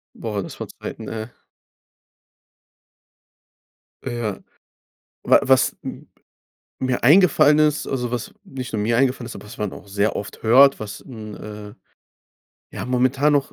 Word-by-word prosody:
Boah, 105 -3 -3
das - - -10
war - - -5
Zeiten, 110 - -8
ey. 110 0 -5 2.8
Ja. 120 -4 -3 0.9
Wa - - +6
was 130 -1 +3
m - - -8 0.7
mir 130 -2 -1
eingefallen 150 -1 +6
ist 150 -1 +2
also, 125 -3 -2
was 125 -2 -4
nicht 130 -3 -7
nur 105 -1 -1
mir 115 +2 +1
eingefallen 130 -2 +1
ist, 115 - -8
aber 100 - -11
was 115 - -11
man 105 -2 -3
auch - - -11
sehr 100 +2 0
oft 100 - -7
hört, 135 +4 +6
was 100 -2 -6
'n, 110 -5 -9
äh, 105 0 -9 1.0
ja, - - -5
momentan 130 +4 +2
noch, 140 -1 0
120 Hz, 140 wpm, -22 LUFS, 105-135 Hz, 2.8 s, Wa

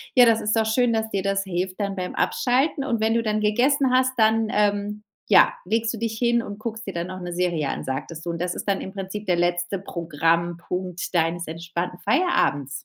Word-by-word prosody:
Ja, 250 - +8
das 225 -1 +4
ist 215 +1 0
doch 225 -1 +2
schön, 235 +1 +2
dass 220 0 -1
dir 195 - 0
das 195 0 0
hilft 185 0 -3
dann 200 -1 -2
beim 185 -1 -4
Abschalten. 270 +4 +1
Und 235 -4 -1
wenn 220 +1 +2
du 230 - +2
dann 215 -1 0
gegessen 255 +6 +2
hast, 255 0 +3
dann, 220 0 +3
ähm, 205 0 0 0.3
ja, 205 - +6
legst 225 +3 0
du - - -5
dich 225 0 -3
hin 235 0 +2
und 205 -3 -7
guckst 225 -1 -6
dir 195 - -4
dann 170 +1 -3
noch 185 0 -7
'ne 175 -1 -5
Serie 175 -5 0
an, - - -4
sagtest 150 +5 -5
du. 170 - -1
Und 170 - -5
das 180 0 -2
ist - - -5
dann 195 -1 +1
im 190 - -7
Prinzip 195 +2 -6
der 180 - +3
letzte 175 +2 0
Programmpunkt 170 +1 -2
deines 170 0 +1
entspannten 170 +2 -4
Feierabends? 200 - +1
200 Hz, 220 wpm, -24 LUFS, 175-225 Hz, 0.3 s, Ja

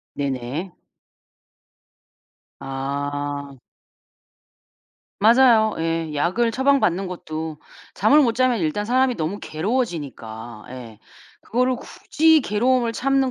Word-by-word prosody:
네네. 140 +6 -4 1.9
아. 140 +1 -4 1.6
맞아요. 225 0 +5
예. 165 -1 -2
약을 185 +11 +1
처방받는 260 -8 +2
것도 160 -3 -6 0.4
잠을 295 +2 +5
못 240 -6 +2
자면 255 0 +2
일단 170 +4 -1
사람이 255 +3 +2
너무 165 +6 -3
괴로워지니까 140 - -4
예 120 -4 -10 0.4
그거를 250 +2 0
굳이 315 +4 +2
괴로움을 240 +1 +1
참는 270 +1 +1
180 Hz, 205 characters per minute, -22 LUFS, -, 1.9 s, 맞아요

